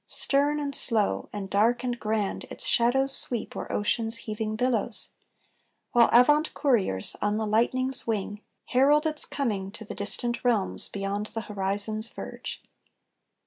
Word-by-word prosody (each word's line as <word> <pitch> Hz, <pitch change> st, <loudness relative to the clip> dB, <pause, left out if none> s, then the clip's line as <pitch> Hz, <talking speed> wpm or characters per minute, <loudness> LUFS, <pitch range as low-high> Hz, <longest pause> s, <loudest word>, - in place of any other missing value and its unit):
Stern, 290 Hz, +2 st, +1 dB
and 285 Hz, -1 st, -4 dB
slow, 220 Hz, -6 st, 0 dB
and 205 Hz, -2 st, -6 dB
dark, 225 Hz, +5 st, +1 dB
and 245 Hz, -1 st, -3 dB
grand, 215 Hz, -2 st, -2 dB
Its -, -, -2 dB
shadows 265 Hz, +3 st, +2 dB
sweep 240 Hz, -3 st, -1 dB
o'er -, -, -6 dB
ocean's 225 Hz, +2 st, +4 dB
heaving 215 Hz, -1 st, -5 dB
billows; 235 Hz, -1 st, +2 dB, 0.8 s
While 235 Hz, -1 st, +4 dB
avant 295 Hz, +6 st, +4 dB
couriers, 210 Hz, -, 0 dB
on 205 Hz, 0 st, 0 dB
the 220 Hz, -, -2 dB
lightning's 255 Hz, +5 st, 0 dB
wing, 205 Hz, -1 st, -3 dB, 0.3 s
Herald 290 Hz, +4 st, +3 dB
its 310 Hz, -1 st, +1 dB
coming 210 Hz, -9 st, -3 dB
to 225 Hz, -1 st, -8 dB
the -, -, -7 dB
distant 235 Hz, +4 st, 0 dB
realms 230 Hz, -6 st, 0 dB
Beyond 200 Hz, +1 st, -4 dB
the 225 Hz, -, -6 dB
horizon's 210 Hz, +2 st, +1 dB
verge. -, -, -8 dB
225 Hz, 145 wpm, -26 LUFS, 210-255 Hz, 0.8 s, ocean's